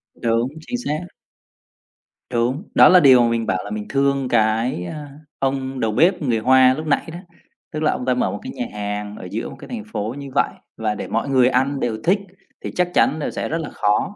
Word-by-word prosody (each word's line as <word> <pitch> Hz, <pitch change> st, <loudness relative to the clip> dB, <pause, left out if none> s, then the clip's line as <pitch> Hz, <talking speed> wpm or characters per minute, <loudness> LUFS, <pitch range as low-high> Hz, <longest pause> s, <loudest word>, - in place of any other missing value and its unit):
Đúng, 115 Hz, +1 st, 0 dB
chính 245 Hz, -, -5 dB
xác. 155 Hz, +4 st, -3 dB, 1.2 s
Đúng, 125 Hz, +6 st, 0 dB
đó -, -, +8 dB
là 180 Hz, -, +8 dB
điều 130 Hz, -6 st, +7 dB
mình 115 Hz, -1 st, 0 dB
bảo 95 Hz, -, 0 dB
là -, -, -7 dB
mình 105 Hz, 0 st, -4 dB
thương 140 Hz, -1 st, +1 dB
cái, 110 Hz, -3 st, +1 dB
à, 145 Hz, -, -7 dB, 0.3 s
ông 135 Hz, -1 st, -2 dB
đầu 110 Hz, -3 st, 0 dB
bếp 170 Hz, -, +3 dB
người 125 Hz, -6 st, +1 dB
Hoa 130 Hz, +2 st, +5 dB
lúc 155 Hz, +4 st, -5 dB
nãy 150 Hz, +3 st, 0 dB
đó, 170 Hz, -, -7 dB, 0.5 s
tức 155 Hz, -1 st, -3 dB
là 155 Hz, -, +3 dB
ông 125 Hz, -, -4 dB
ta 130 Hz, -, +2 dB
mở 125 Hz, -, 0 dB
một -, -, -5 dB
cái 255 Hz, -, -7 dB
nhà 250 Hz, -, -3 dB
hàng 105 Hz, 0 st, -4 dB
ở -, -, -8 dB
giữa 110 Hz, +3 st, -3 dB
một -, -, -10 dB
cái -, -, -10 dB
thành 235 Hz, -3 st, -5 dB
phố 110 Hz, -, -3 dB
như 140 Hz, -1 st, -7 dB
vậy, -, -, +3 dB, 0.3 s
và 110 Hz, -1 st, -1 dB
để -, -, -5 dB
mọi 115 Hz, +5 st, -2 dB
người 130 Hz, -2 st, +4 dB
ăn 135 Hz, +2 st, +1 dB
đều 115 Hz, -4 st, -1 dB
thích 190 Hz, +4 st, +3 dB, 0.4 s
thì -, -, -5 dB
chắc 180 Hz, 0 st, +1 dB
chắn, 155 Hz, -, +3 dB
ờ, 150 Hz, -, -3 dB
sẽ -, -, -4 dB
rất 160 Hz, -, -1 dB
là 160 Hz, -2 st, -5 dB
khó. 105 Hz, -, 0 dB
130 Hz, 230 wpm, -21 LUFS, 115-150 Hz, 1.2 s, đó